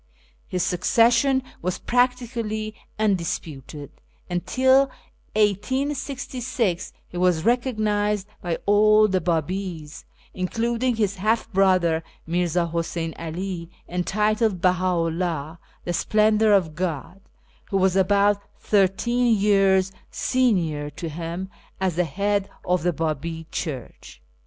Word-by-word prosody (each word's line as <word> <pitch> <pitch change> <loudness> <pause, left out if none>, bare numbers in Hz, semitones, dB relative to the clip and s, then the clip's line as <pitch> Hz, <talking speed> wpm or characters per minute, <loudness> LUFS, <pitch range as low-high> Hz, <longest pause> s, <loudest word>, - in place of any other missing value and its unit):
His 180 -1 -1
succession 235 +8 +3 0.2
was 180 +1 -2
practically 235 -3 -1 0.2
undisputed; 160 -8 -2 0.4
and 175 0 -1
till 260 +5 +4 0.5
1866 250 -1 -1 0.2
he 175 - -7
was 180 -3 +2
recog 245 +2 +1
nised 210 -1 0 0.2
by 170 -2 -2
all 215 +1 +5
the 185 -2 0
Bdbis, 170 -1 -3 0.3
including 230 +6 -1
his 205 -3 0
half 220 +4 0
brother 185 -4 +3 0.2
Mirza 175 0 0
Huseyn 165 -1 -2
'Ali, 170 +1 -5 0.2
entitled 210 +3 0
BcJui'xi'Uoh 170 -3 0
(" - - -33
The 175 - -1
Sjdendour 215 +3 +4
of 165 -5 -3
God 175 +2 -4 0.2
"), - - -34
who 195 - +1
was 190 -1 +2
about 200 +1 +3 0.2
thirteen 225 +4 +2
years 195 -2 +3 0.2
senior 175 - 0
to 160 +3 -6
him, 170 +4 -5 0.3
as 185 -3 0
the 180 - +2
Head 200 +4 -1 0.2
of 180 0 +1
the 175 +2 +1
Babi 160 +1 -3
Church. 130 - -6
190 Hz, 115 wpm, -24 LUFS, 170-215 Hz, 0.5 s, all